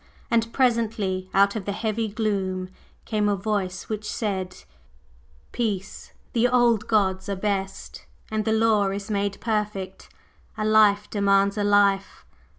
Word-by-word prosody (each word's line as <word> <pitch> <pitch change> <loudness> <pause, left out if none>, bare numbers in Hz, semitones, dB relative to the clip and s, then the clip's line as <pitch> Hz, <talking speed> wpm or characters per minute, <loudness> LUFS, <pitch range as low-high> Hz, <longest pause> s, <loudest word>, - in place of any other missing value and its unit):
And 230 0 +2
presently, 220 -7 0
out 200 +1 +3
of 210 -4 -4
the 200 - -2
heavy 220 +1 -2
gloom 195 -4 -2 0.4
came 210 -2 0
a 205 - +2
Voice 195 -2 -3
which 215 -1 -4
said: 190 -4 -3 0.9
"Peace! 205 -4 -3 0.2
The 240 +1 +3
old 240 -3 +3
gods 190 -3 +1
are 200 - -1
best, 195 -1 -4 0.2
and 215 0 0
the 220 - 0
law 220 -2 +3
is 200 +2 -5
made 200 -1 -1
perfect. 210 -4 -3 0.5
A 215 - -1
life 210 -1 +4
demands 200 -1 +2
a 210 - -1
life. 200 -1 +2
205 Hz, 140 wpm, -24 LUFS, 195-220 Hz, 0.9 s, life